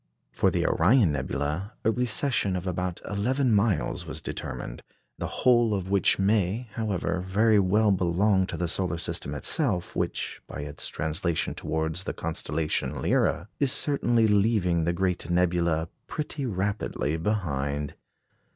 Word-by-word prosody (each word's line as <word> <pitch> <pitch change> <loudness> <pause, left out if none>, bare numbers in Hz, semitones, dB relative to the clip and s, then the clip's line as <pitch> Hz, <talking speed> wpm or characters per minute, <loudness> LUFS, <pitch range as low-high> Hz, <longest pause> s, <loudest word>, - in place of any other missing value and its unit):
For - - +2
the - - 0
Orion 100 - +4
nebula, 75 - -2
a 110 - +5
recession 120 -3 +1
of 90 0 -3
about 90 -1 -3
eleven 125 +5 +1
miles 100 -1 +1
was - - -5
determined, - - -6 0.4
the - - -2
whole 120 -4 +3
of 95 -1 -4
which 100 -1 +3
may, 105 +3 +1
however, 95 -5 -1
very 105 +4 +3
well 105 +3 +3
belong 95 +1 +2
to - - -5
the 90 - -1
solar 90 0 0
system 75 -3 -2
itself, 95 - 0
which, - - -2
by - - -6
its 75 0 -3
translation 80 +1 -1
towards 80 +3 -2
the - - -2
constellation 75 0 -2
Lyra, 85 - +1
is 140 -3 +3
certainly 120 -5 +2
leaving 100 -5 +2
the 85 - +1
great 90 -1 -1
nebula 85 -2 +1 0.2
pretty 150 -3 -4
rapidly 100 -6 -1
behind. 75 -7 -2
95 Hz, 140 wpm, -27 LUFS, 85-110 Hz, 0.4 s, a